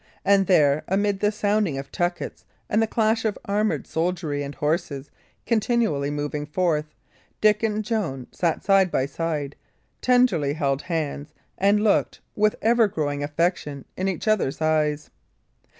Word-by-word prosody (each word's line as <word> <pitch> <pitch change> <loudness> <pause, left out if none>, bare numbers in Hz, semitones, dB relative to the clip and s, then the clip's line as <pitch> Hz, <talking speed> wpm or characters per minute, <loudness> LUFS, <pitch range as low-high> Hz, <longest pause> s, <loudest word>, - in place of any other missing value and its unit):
And 195 -1 +4
there, 150 -5 +4
amid 200 +1 +1
the 210 +1 +2
sounding 205 -7 0
of 135 0 -7
tuckets 175 0 -3 0.3
and 215 - +3
the 225 - +2
clash 220 0 +1
of 220 -2 -1
armoured 210 +1 0
soldiery 160 -3 -2
and 140 0 -5
horses 150 -3 -2 0.3
continually 220 - +1
moving 145 0 -3
forth, 155 -2 0 0.5
Dick 210 0 +4
and 215 -1 -1
Joan 195 - -2
sat 170 -3 -1
side 195 -2 +4
by 130 - 0
side, 150 -1 -3 0.5
tenderly 245 - +3
held 140 -2 0
hands, 155 -4 -4 0.2
and 205 +2 +3
looked, 210 - +2 0.2
with 215 0 +2
ever 230 0 +4
growing 145 -6 -2
affection, 145 -2 -1
in 185 - -2
each 190 +3 -3
other's 190 -10 +1
eyes. 155 -1 0
175 Hz, 145 wpm, -24 LUFS, 145-210 Hz, 0.5 s, And